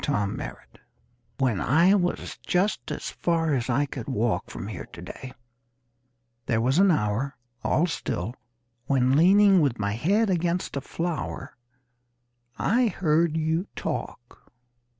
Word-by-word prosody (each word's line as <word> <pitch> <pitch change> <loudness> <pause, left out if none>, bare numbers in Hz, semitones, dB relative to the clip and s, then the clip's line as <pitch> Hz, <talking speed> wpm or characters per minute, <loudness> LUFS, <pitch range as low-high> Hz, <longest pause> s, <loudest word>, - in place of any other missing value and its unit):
THE - - -2
TELEPHONE 105 -9 -1 0.9
"When 125 -8 +1
I 165 - +4
was 180 -3 -1
just 190 +4 0
as - - -4
far 165 -3 0
as 125 -2 -1
I 135 +4 +2
could 130 -4 -7
walk 120 -3 -1
From - - -7
here - - -7
to - - -9
day, 130 - -8 1.2
There 115 - +1
was 130 +8 +2
an 195 0 +6
hour 135 - 0 0.3
All 165 - +2
still 115 - -3 0.5
When 130 -1 +3
leaning 195 +3 +6
with 135 -6 +1
my 100 -1 -1
head 195 - +1
against 175 -1 -1
a 140 - -2
flower 165 +3 -4 1.0
I 240 +3 +2
heard 165 -4 +1
you 160 +4 0
talk. 125 -6 -6
155 Hz, 135 wpm, -26 LUFS, 125-175 Hz, 1.2 s, an